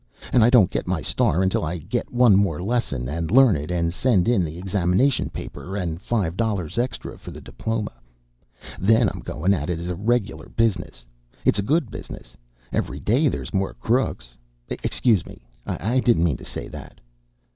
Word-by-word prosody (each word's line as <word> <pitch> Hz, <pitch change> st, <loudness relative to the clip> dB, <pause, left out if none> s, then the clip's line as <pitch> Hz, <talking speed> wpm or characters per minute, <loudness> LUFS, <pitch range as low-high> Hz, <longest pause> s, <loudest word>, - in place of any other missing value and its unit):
And 120 Hz, -, +6 dB
I 115 Hz, -, +6 dB
don't 110 Hz, -7 st, +5 dB
get -, -, -2 dB
my 90 Hz, -3 st, -1 dB
star 90 Hz, +5 st, +1 dB
until 95 Hz, -2 st, +1 dB
I 80 Hz, +3 st, -2 dB
get 100 Hz, +10 st, -3 dB
one 120 Hz, -4 st, +5 dB
more 95 Hz, -6 st, +2 dB
lesson, 90 Hz, -, -1 dB
and 80 Hz, +3 st, -3 dB
learn 130 Hz, -4 st, +6 dB
it, 75 Hz, +2 st, -4 dB
and 85 Hz, -1 st, 0 dB
send 110 Hz, -3 st, +2 dB
in 115 Hz, -6 st, +3 dB
the 80 Hz, 0 st, -5 dB
examination 95 Hz, +7 st, +1 dB
paper, 95 Hz, +2 st, -7 dB
and 85 Hz, -3 st, -3 dB
five 100 Hz, -8 st, -1 dB
dollars 100 Hz, -3 st, -1 dB
extra 125 Hz, +1 st, -3 dB
for -, -, -10 dB
the -, -, -9 dB
diploma. 110 Hz, -, -4 dB, 0.9 s
Then 110 Hz, +2 st, +4 dB
I'm -, -, -7 dB
goin' 90 Hz, +6 st, 0 dB
at 75 Hz, -4 st, -2 dB
it 85 Hz, -, -1 dB
as 85 Hz, +1 st, -5 dB
a -, -, -1 dB
reg'lar 110 Hz, +2 st, -1 dB
business. 95 Hz, -, -1 dB, 0.4 s
It's -, -, +3 dB
a -, -, +3 dB
good 140 Hz, +2 st, +1 dB
business. -, -, -9 dB, 0.4 s
Every 70 Hz, +3 st, -2 dB
day 130 Hz, -, +2 dB
there's 130 Hz, -, -3 dB
more 95 Hz, -1 st, -1 dB
crooks 115 Hz, -, -1 dB, 0.3 s
excuse 110 Hz, -9 st, +1 dB
me, -, -, -13 dB, 0.2 s
I 120 Hz, +6 st, 0 dB
didn't 120 Hz, -9 st, +3 dB
mean 80 Hz, -7 st, +1 dB
to -, -, -12 dB
say -, -, -6 dB
that." -, -, -10 dB
95 Hz, 185 wpm, -23 LUFS, 85-115 Hz, 0.9 s, And